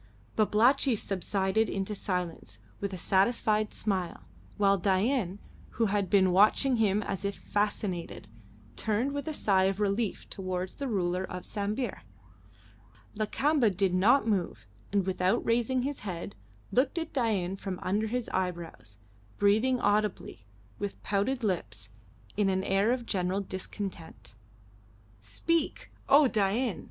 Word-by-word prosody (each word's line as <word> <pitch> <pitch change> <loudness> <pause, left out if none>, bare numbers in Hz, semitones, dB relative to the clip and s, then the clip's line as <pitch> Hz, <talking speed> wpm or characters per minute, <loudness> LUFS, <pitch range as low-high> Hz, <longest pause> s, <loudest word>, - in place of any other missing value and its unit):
Babalatchi 235 +5 +3
subsided 195 +1 0
into 195 +2 -2
silence 180 - -4 0.2
with 200 - -3
a 185 - -5
satisfied 210 +3 +2
smile, 185 - -2 0.4
while 200 -1 +3
Dain, 195 +1 +1 0.4
who 230 - +3
had 200 -2 0
been 190 -3 +4
watching 215 +7 +4
him 210 -1 +2
as 195 -1 -4
if 200 0 -2
fascinated, 205 - -2 0.5
turned 225 +5 0
with 285 +2 -4
a - - -1
sigh 195 -8 +2
of 195 +1 0
relief 210 +1 -1
towards 185 -1 -4
the 280 - -4
ruler 185 -5 0
of 180 -1 -6
Sambir. 210 +3 -3 1.1
Lakamba 245 +4 +2
did 190 -1 0
not 220 +6 +4
move, 195 -6 -1 0.3
and, 200 -2 +1
without 190 +3 +1
raising 240 +2 +1
his 280 +1 -2
head, 180 -5 -5 0.4
looked 265 +6 +1
at 325 -1 -3
Dain 205 -8 0
from 190 -1 -5
under 210 +4 0
his 245 +1 -2
eyebrows, 170 - -4 0.4
breathing 220 +6 +3
audibly, 205 - -1 0.3
with 205 -1 -5
pouted 210 +6 0
lips, 110 - -3 0.5
in 205 -2 +2
an 190 0 0
air 195 +4 +2
of 250 -1 -1
general 185 -1 -1
discontent. 190 - -7 0.9
"Speak! 295 - -2 0.2
O 285 0 +7
Dain!" 215 0 0
200 Hz, 130 wpm, -29 LUFS, 185-230 Hz, 1.1 s, O